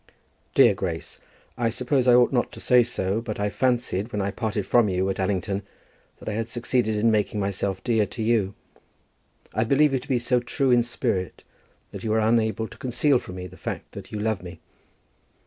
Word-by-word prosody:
Dear -, -, +7 dB
Grace, -, -, -5 dB, 0.4 s
I 115 Hz, -1 st, +2 dB
suppose 125 Hz, +2 st, 0 dB
I 120 Hz, -, +7 dB
ought 125 Hz, +2 st, +4 dB
not 120 Hz, -, +1 dB
to -, -, -9 dB
say 125 Hz, -1 st, +5 dB
so, 110 Hz, -3 st, -1 dB
but 110 Hz, -3 st, -5 dB
I 105 Hz, 0 st, 0 dB
fancied 120 Hz, -4 st, 0 dB
when 105 Hz, -, -2 dB
I 100 Hz, 0 st, -1 dB
parted 105 Hz, -1 st, -2 dB
from 120 Hz, -4 st, +4 dB
you 95 Hz, +1 st, 0 dB
at -, -, -6 dB
Allington, 95 Hz, +1 st, -1 dB, 0.6 s
that -, -, -14 dB
I -, -, 0 dB
had 115 Hz, +1 st, -2 dB
succeeded 120 Hz, -2 st, 0 dB
in 110 Hz, +2 st, +3 dB
making 105 Hz, -1 st, 0 dB
myself 100 Hz, -1 st, -2 dB
dear 110 Hz, -4 st, +2 dB
to 115 Hz, -, -5 dB
you. 110 Hz, -4 st, +1 dB, 1.0 s
I 110 Hz, -, +1 dB
believe 140 Hz, +4 st, +3 dB
you 135 Hz, -, +2 dB
to 125 Hz, -, -14 dB
be 130 Hz, -4 st, +2 dB
so 125 Hz, +1 st, +1 dB
true 130 Hz, +2 st, 0 dB
in 120 Hz, -1 st, +5 dB
spirit, 115 Hz, -6 st, -2 dB, 0.5 s
that -, -, -8 dB
you 110 Hz, -, -2 dB
were 110 Hz, +1 st, +2 dB
unable 110 Hz, 0 st, +1 dB
to -, -, -15 dB
conceal 130 Hz, +2 st, +2 dB
from 90 Hz, -, -9 dB
me 90 Hz, 0 st, -6 dB
the 90 Hz, 0 st, -11 dB
fact -, -, -6 dB
that -, -, -10 dB
you 105 Hz, -, -4 dB
love 110 Hz, -1 st, -1 dB
me. 90 Hz, 0 st, -10 dB
110 Hz, 205 wpm, -25 LUFS, 100-125 Hz, 1.0 s, Dear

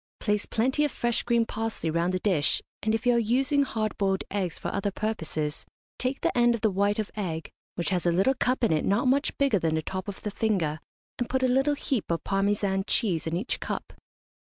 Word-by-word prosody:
Place 210 Hz, -1 st, 0 dB
plenty 260 Hz, +6 st, +1 dB
of 295 Hz, -, +2 dB
fresh 240 Hz, -1 st, 0 dB
green 235 Hz, -1 st, +2 dB
parsley 225 Hz, -8 st, -3 dB
round 170 Hz, +2 st, +1 dB
the 185 Hz, -, 0 dB
dish, 180 Hz, -8 st, +2 dB, 0.2 s
and, 220 Hz, +1 st, +1 dB
if 225 Hz, -, -4 dB
you 245 Hz, -, +5 dB
are 235 Hz, -, +4 dB
using 265 Hz, +6 st, +2 dB
hard 220 Hz, -6 st, -1 dB
boiled 195 Hz, -1 st, +1 dB
eggs 190 Hz, -4 st, -1 dB
for -, -, -4 dB
other 200 Hz, +1 st, 0 dB
purposes, 160 Hz, -8 st, -3 dB, 0.4 s
take 255 Hz, +2 st, -1 dB
the -, -, 0 dB
end 240 Hz, -1 st, +4 dB
of 230 Hz, -, -6 dB
the 220 Hz, -, +3 dB
white 200 Hz, +2 st, +1 dB
of 215 Hz, -1 st, -2 dB
egg, 165 Hz, -6 st, -4 dB, 0.2 s
which 175 Hz, -, -1 dB
has 180 Hz, -2 st, 0 dB
a -, -, +4 dB
little 190 Hz, +10 st, +3 dB
cup 255 Hz, -1 st, 0 dB
in 230 Hz, -, +4 dB
it 155 Hz, -, +1 dB
not 210 Hz, +7 st, +2 dB
much 280 Hz, +3 st, +2 dB
bigger 275 Hz, -8 st, +3 dB
than 160 Hz, -2 st, +1 dB
the 160 Hz, -, -1 dB
top 185 Hz, +2 st, -4 dB
of 200 Hz, -, -7 dB
the 210 Hz, -, -2 dB
finger, 185 Hz, -9 st, 0 dB, 0.4 s
and 245 Hz, -, -1 dB
put 260 Hz, 0 st, 0 dB
a -, -, +5 dB
little 270 Hz, +3 st, +3 dB
heap 265 Hz, -5 st, -2 dB
of 165 Hz, -2 st, -1 dB
Parmesan 195 Hz, 0 st, +1 dB
cheese 175 Hz, -8 st, 0 dB
in 160 Hz, -, -1 dB
each 210 Hz, +8 st, -2 dB
cup. -, -, -4 dB
210 Hz, 225 wpm, -27 LUFS, 185-240 Hz, 0.4 s, you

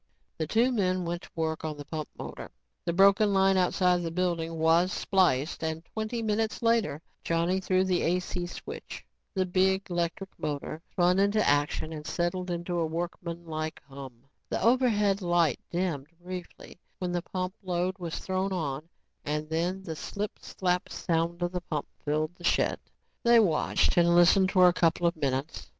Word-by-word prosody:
The 160 Hz, -, -1 dB
two 230 Hz, +8 st, +3 dB
men 185 Hz, -6 st, 0 dB
went 170 Hz, +1 st, -3 dB
to -, -, -13 dB
work 160 Hz, -1 st, -2 dB
on 155 Hz, -2 st, -3 dB
the 145 Hz, -, -8 dB
pump 155 Hz, 0 st, -5 dB
motor. -, -, -7 dB, 0.4 s
The -, -, +1 dB
broken 200 Hz, +3 st, +5 dB
line 195 Hz, 0 st, +4 dB
outside 180 Hz, -1 st, +3 dB
the 170 Hz, -, -2 dB
building 165 Hz, -1 st, -1 dB
was 165 Hz, +3 st, +3 dB
spliced 175 Hz, -8 st, +1 dB
and 160 Hz, +1 st, -3 dB
twenty 220 Hz, +3 st, -4 dB
minutes 220 Hz, +1 st, -1 dB
later, 225 Hz, -9 st, +1 dB, 0.2 s
Johnny 170 Hz, +3 st, +1 dB
threw 185 Hz, 0 st, +2 dB
the 185 Hz, -2 st, +1 dB
AC 180 Hz, 0 st, -1 dB
switch. -, -, -8 dB, 0.3 s
The 190 Hz, -1 st, +2 dB
big, 190 Hz, +1 st, +1 dB
electric 175 Hz, +2 st, -2 dB
motor 150 Hz, +1 st, -4 dB
spun 180 Hz, +1 st, +2 dB
into 205 Hz, +2 st, +3 dB
action 145 Hz, +2 st, +1 dB
and 150 Hz, -1 st, -7 dB
settled 180 Hz, +1 st, -1 dB
into 175 Hz, 0 st, -2 dB
a 165 Hz, -, +1 dB
workmanlike 165 Hz, -1 st, -4 dB
hum. 135 Hz, -4 st, -10 dB, 0.3 s
The -, -, -1 dB
overhead 220 Hz, -5 st, +3 dB
light 175 Hz, -5 st, +2 dB
dimmed 170 Hz, -6 st, -2 dB
briefly 180 Hz, -1 st, -9 dB, 0.2 s
when 180 Hz, -1 st, -3 dB
the 175 Hz, 0 st, -1 dB
pump 185 Hz, +1 st, -4 dB
load 185 Hz, 0 st, -1 dB
was 170 Hz, -2 st, -4 dB
thrown 190 Hz, +1 st, -2 dB
on 155 Hz, -3 st, -3 dB, 0.3 s
and 150 Hz, +1 st, -2 dB
then 175 Hz, +4 st, -1 dB
the 165 Hz, -4 st, -5 dB
slip 200 Hz, +6 st, -5 dB
slap 180 Hz, -1 st, -1 dB
sound 170 Hz, +1 st, -1 dB
of 175 Hz, -, 0 dB
the 180 Hz, -1 st, -3 dB
pump 150 Hz, -4 st, -3 dB, 0.2 s
filled 155 Hz, +2 st, 0 dB
the 175 Hz, -, -14 dB
shed. -, -, +2 dB, 0.4 s
They 235 Hz, 0 st, +6 dB
watched 175 Hz, -9 st, +2 dB
and 170 Hz, 0 st, +5 dB
listened 185 Hz, +2 st, +5 dB
for 185 Hz, -1 st, +6 dB
a 175 Hz, -, +4 dB
couple 170 Hz, 0 st, +2 dB
of 170 Hz, -, +2 dB
minutes. 140 Hz, 0 st, -3 dB
175 Hz, 170 wpm, -28 LUFS, 160-190 Hz, 0.4 s, They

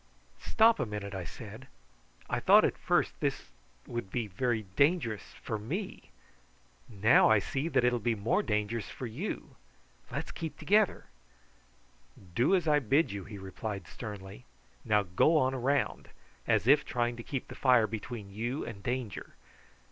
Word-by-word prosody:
"Stop 225 Hz, -, +4 dB
a -, -, +1 dB
moment," 105 Hz, -1 st, -5 dB
I 95 Hz, -2 st, -4 dB
said. -, -, -10 dB, 0.6 s
"I -, -, -1 dB
thought -, -, +6 dB
at -, -, 0 dB
first -, -, +1 dB
that -, -, +2 dB
it -, -, -13 dB, 0.5 s
would 120 Hz, -5 st, -5 dB
be 120 Hz, +3 st, -2 dB
very 110 Hz, +3 st, -1 dB
dangerous 140 Hz, -, +1 dB
for 110 Hz, -, -3 dB
me; 175 Hz, -, -5 dB, 0.8 s
now 110 Hz, +1 st, +5 dB
I 110 Hz, -, +6 dB
see 135 Hz, +9 st, -2 dB
that 135 Hz, -6 st, +2 dB
it 125 Hz, -, +4 dB
will 120 Hz, -, 0 dB
be 115 Hz, +1 st, 0 dB
more 115 Hz, -, +1 dB
dangerous 105 Hz, -, -2 dB
for 130 Hz, -, -7 dB
you. 130 Hz, -, -5 dB, 0.5 s
Let's -, -, -4 dB
keep 160 Hz, -3 st, -6 dB
together." 210 Hz, 0 st, +2 dB, 1.3 s
"Do 125 Hz, -, +3 dB
as 175 Hz, -4 st, 0 dB
I 150 Hz, -1 st, +5 dB
bid 140 Hz, +1 st, +2 dB
you," 100 Hz, -2 st, -6 dB
he 105 Hz, -1 st, -8 dB
replied 95 Hz, -1 st, -6 dB
sternly. 95 Hz, -, -8 dB, 0.4 s
"Now 105 Hz, -2 st, +3 dB
go 100 Hz, -, +3 dB
on 130 Hz, -3 st, +2 dB
round, 135 Hz, +2 st, 0 dB, 0.4 s
as -, -, +2 dB
if 140 Hz, +4 st, +6 dB
trying 120 Hz, 0 st, -1 dB
to -, -, -6 dB
keep 135 Hz, 0 st, -4 dB
the -, -, -9 dB
fire 125 Hz, -4 st, +4 dB
between 110 Hz, -1 st, -6 dB
you 120 Hz, +7 st, -3 dB
and 100 Hz, -4 st, -8 dB
danger. 120 Hz, -1 st, -4 dB
120 Hz, 165 wpm, -30 LUFS, 105-140 Hz, 1.3 s, thought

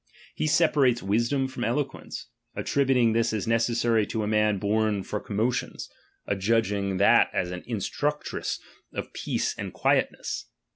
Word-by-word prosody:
He -, -, -1 dB
separates 145 Hz, -7 st, +3 dB
wisdom 120 Hz, +7 st, +1 dB
from 130 Hz, -2 st, -5 dB
elo 125 Hz, +5 st, +1 dB
fjue^iice; 135 Hz, -, -9 dB, 0.3 s
attributing 130 Hz, -5 st, +2 dB
this 115 Hz, 0 st, +1 dB
as 105 Hz, -3 st, -1 dB
necessary 115 Hz, -1 st, +2 dB
to 110 Hz, -, -2 dB
a -, -, -2 dB
man 105 Hz, -1 st, +2 dB
oorn 105 Hz, -1 st, +1 dB
for 105 Hz, +3 st, -3 dB
commotions; 110 Hz, +5 st, -2 dB, 0.3 s
adjudging 100 Hz, -1 st, 0 dB
that 100 Hz, -, +5 dB
as 90 Hz, 0 st, -1 dB
an 90 Hz, 0 st, -5 dB
in 115 Hz, -2 st, -2 dB
structress 150 Hz, +9 st, -2 dB, 0.3 s
of -, -, -6 dB
peace -, -, -1 dB
and -, -, -4 dB
quietness. -, -, 0 dB
115 Hz, 145 wpm, -26 LUFS, 105-125 Hz, 0.3 s, that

